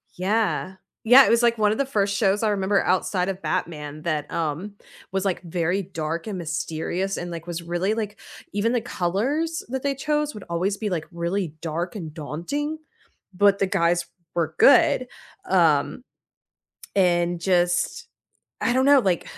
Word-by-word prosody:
Yeah. 190 0 0 0.3
Yeah, 255 +4 +9
it - - +1
was, 235 +1 +4
like, 235 -1 +3
one 210 -1 +3
of 220 - -2
the 275 - +1
1st 200 -5 0
shows 200 0 +2
I 220 - +2
remember 195 0 +1
outside 185 0 0
of 190 0 -5
Batman 155 -2 -3
that, 155 -3 -2
um, 165 +6 -3 0.4
was, 195 0 -1
like, 190 -2 -1
very 175 +2 -1
dark 165 -2 -4
and 210 -3 -4
mysterious 165 +3 -3
and, 175 - -5
like, 165 -1 -7
was 170 -1 -5
really, 175 +5 -1
like 210 -2 -4 0.3
even 205 +4 +1
the 245 - +1
colors 255 - -1
that 260 +1 -3
they 280 -1 0
chose 300 +2 -1
would 210 - -9
always 185 +4 0
be, 210 0 -3
like, 165 -4 -2
really 170 -1 -2
dark 170 +4 -3
and 160 -6 -6
daunting, 185 - -4 0.5
but 200 +1 +4
the 195 - +2
guys 170 -1 +1 0.3
were 165 -2 -1
good, 255 -2 +5 0.4
um, 165 - +2 0.9
and 175 -2 +2
just 175 - +1 0.6
I - - +2
don't 260 +1 +3
know, 285 -1 +7
like 185 -7 +1
190 Hz, 165 wpm, -24 LUFS, 170-215 Hz, 0.9 s, Yeah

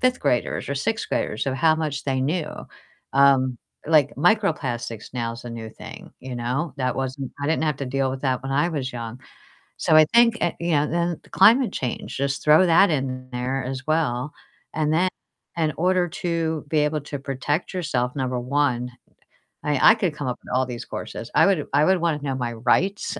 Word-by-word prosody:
5th 255 0 +2
graders 120 - 0
or 140 - -2
6th 225 +11 -2
graders 105 - -1
of 135 - 0
how 155 +4 +3
much 155 -3 -3
they 135 -2 0
knew, 150 +4 -1 0.7
um, 135 -2 +4 0.3
like 150 -3 +3
microplastics 140 - 0
now 115 -2 -2
is 115 - -10
a 120 - -6
new 115 -1 -7
thing, - - -11
you 130 -1 -6
know? 125 +6 -2
That 130 -2 -1
wasn't 135 0 -4
I - - -1
didn't 160 0 +1
have 150 -3 0
to 140 - -4
deal 135 +1 0
with 130 0 -5
that 130 -3 0
when 135 - -3
I 145 +5 +2
was 135 -5 -3
young, 120 0 -6 0.6
so 155 - +3
I 155 - +8
think 235 0 +5
uh, 175 - +2
you 170 0 -1
know, 150 -1 +3
then 170 0 -1
the - - -21
climate 240 +3 +5
change, 125 -3 -4
just 140 0 -2
throw 155 +4 +6
that 170 +3 +5
in 130 -3 -2
there 130 +2 -2
as 130 +2 -5
well, 150 -4 0 0.4
and 155 -1 0
then 175 +4 +3 0.5
in 155 -2 +1
order 180 +1 +2
to 165 -3 -2
be 155 - +2
able 150 +1 0
to 145 0 -6
protect 140 +4 -2
yourself, 130 -8 -1
number 130 -2 -1
1, 125 -1 0 0.7
I 150 +3 +5
I - - +2
could 185 -8 -1
come 145 -3 -4
up 125 - -3
with - - -5
all 130 +1 +3
these 120 -2 -6
courses, 115 - -7
I - - +6
would 190 -7 +1
I 145 +2 +5
would 190 0 +3
wanna 160 -3 0
know 135 -2 -2
my 120 -2 -2
rights, 175 - 0
140 Hz, 205 wpm, -23 LUFS, 130-160 Hz, 0.7 s, I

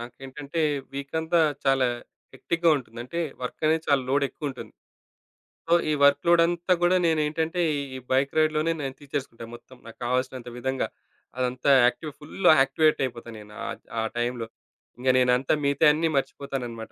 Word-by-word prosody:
నాకేంటంటే 135 +6 -6 0.3
వీకంతా 160 +4 0 0.2
చాలా 135 -1 +3 0.5
హెక్టిక్‌గా 170 0 0
ఉంటుంది. 115 -3 -9
అంటే 170 +8 -4 0.2
వర్కనేది 155 +5 0
చాలా 140 -2 +3
లోడ్ 140 +1 +2
ఎక్కువుంటుంది. 140 -5 -7 1.0
సో 170 - +3 0.2
ఈ - - +2
వర్క్‌ 140 0 +4
లోడంతా 175 +1 +3
గూడా 180 +1 +4
నేనేంటంటే 160 +2 0 0.3
ఈ - - -4
బైక్ 135 +1 +2
రైడ్‌లోనే 155 +1 +2
నేను 135 -1 -4
తీర్చేసుకుంటా 135 -5 -6
మొత్తం. 130 +1 -16
నాకు 115 -1 -12
కావాల్సినంత 125 0 -2
విధంగా 130 +1 -2 0.5
అదంతా 125 +2 +1
యాక్టివ్‌ఫుల్‌గా 155 +6 +1
యాక్టివేట్ 155 +3 +2
అయిపోతాను 115 -2 -8
నేను. 105 0 -14
ఆహ్, - - -6 0.2
ఆ - - +1 0.2
టైమ్‌లో. 120 -1 -2 0.5
ఇంగ 130 +1 0
నేనంతా 125 +2 +2
మిగతాయన్నీ 150 +3 +3
మర్చిపోతానన్నమాట. 125 -5 -4
140 Hz, 130 wpm, -25 LUFS, 125-160 Hz, 1.0 s, వర్క్‌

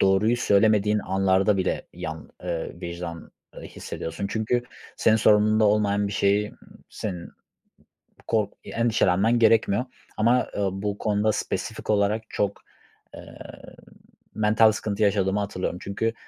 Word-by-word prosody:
Doğruyu 100 +5 +3
söylemediğin 105 -1 +3
anlarda 95 +1 +2
bile, 95 - -1
yan 80 0 -7
ııı, 85 -2 -4
vicdan, 85 -1 -7 0.2
ııı, - - -10
hissediyorsun 85 +5 -6
çünkü 115 +4 -1 0.3
senin 110 0 +4
sorumluluğunda 110 0 +4
olmayan 105 -1 +2
bir 100 - -4
şeyi 100 +2 +1 0.4
senin 90 -5 -6 1.0
kork 110 -3 0
eee, - - -9
endişelenmen 115 -1 +2
gerekmiyor 110 0 +3 0.3
ama, 120 +3 +3
eee, - - -3
bu 100 +1 -3
konuda 105 0 +1
spesifik - - -4
olarak 105 +1 +2
çok, 100 0 -2 0.5
eee, - - -12 1.0
mental 110 +1 +4
sıkıntı 105 -1 -2
yaşadığımı 100 -1 +2
hatırlıyorum. 95 -3 -3
Çünkü 115 +3 -2
105 Hz, 120 wpm, -25 LUFS, 95-110 Hz, 1.0 s, senin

